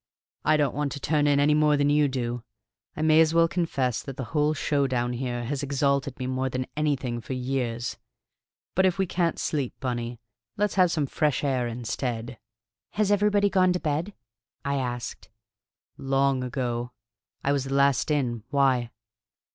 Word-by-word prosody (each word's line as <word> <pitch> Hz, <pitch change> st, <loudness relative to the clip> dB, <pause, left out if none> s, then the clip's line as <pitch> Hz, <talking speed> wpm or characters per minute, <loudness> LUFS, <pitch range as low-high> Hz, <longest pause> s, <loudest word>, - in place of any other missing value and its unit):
I 155 Hz, 0 st, +4 dB
don't 145 Hz, -4 st, +1 dB
want 145 Hz, 0 st, -1 dB
to 145 Hz, -, -6 dB
turn 145 Hz, +1 st, +1 dB
in, 145 Hz, -1 st, +4 dB
any 145 Hz, +1 st, +4 dB
more 150 Hz, -1 st, +4 dB
than 145 Hz, 0 st, +2 dB
you 150 Hz, 0 st, +4 dB
do. 120 Hz, -3 st, -3 dB, 0.6 s
I 155 Hz, -, -1 dB
may 155 Hz, 0 st, +6 dB
as 160 Hz, 0 st, +3 dB
well 165 Hz, 0 st, +5 dB
confess 140 Hz, -9 st, -1 dB
that 135 Hz, -2 st, -8 dB
the 130 Hz, -, -3 dB
whole 150 Hz, 0 st, +2 dB
show 140 Hz, -1 st, +1 dB
down 120 Hz, -1 st, -1 dB
here 120 Hz, -1 st, -3 dB
has 140 Hz, +3 st, -2 dB
exalted 140 Hz, -1 st, 0 dB
me 130 Hz, -, -4 dB
more 130 Hz, +1 st, -1 dB
than 130 Hz, 0 st, -2 dB
anything 135 Hz, -6 st, -1 dB
for 130 Hz, -, -5 dB
years. 125 Hz, -2 st, -2 dB, 0.7 s
But 190 Hz, +1 st, +4 dB
if 185 Hz, -, 0 dB
we 190 Hz, -, +2 dB
can't 170 Hz, -1 st, 0 dB
sleep, 140 Hz, -5 st, -2 dB
Bunny, 120 Hz, -3 st, -3 dB, 0.4 s
let's 210 Hz, 0 st, +1 dB
have 185 Hz, -2 st, +4 dB
some 155 Hz, -4 st, +1 dB
fresh 150 Hz, 0 st, 0 dB
air 130 Hz, -4 st, +1 dB
instead." 120 Hz, 0 st, -4 dB, 0.5 s
"Has 210 Hz, -1 st, +1 dB
everybody 205 Hz, 0 st, +3 dB
gone 185 Hz, -2 st, +3 dB
to 180 Hz, -, -1 dB
bed?" 160 Hz, +6 st, -2 dB, 0.5 s
I 140 Hz, 0 st, 0 dB
asked. 125 Hz, -2 st, -4 dB, 0.7 s
"Long 135 Hz, -1 st, +1 dB
ago. 125 Hz, -1 st, -3 dB, 0.5 s
I 140 Hz, -, +2 dB
was 140 Hz, -2 st, 0 dB
the 135 Hz, 0 st, -2 dB
last 140 Hz, -1 st, +3 dB
in. 125 Hz, -6 st, 0 dB
Why?" 135 Hz, -4 st, +2 dB
140 Hz, 175 wpm, -26 LUFS, 125-150 Hz, 0.7 s, may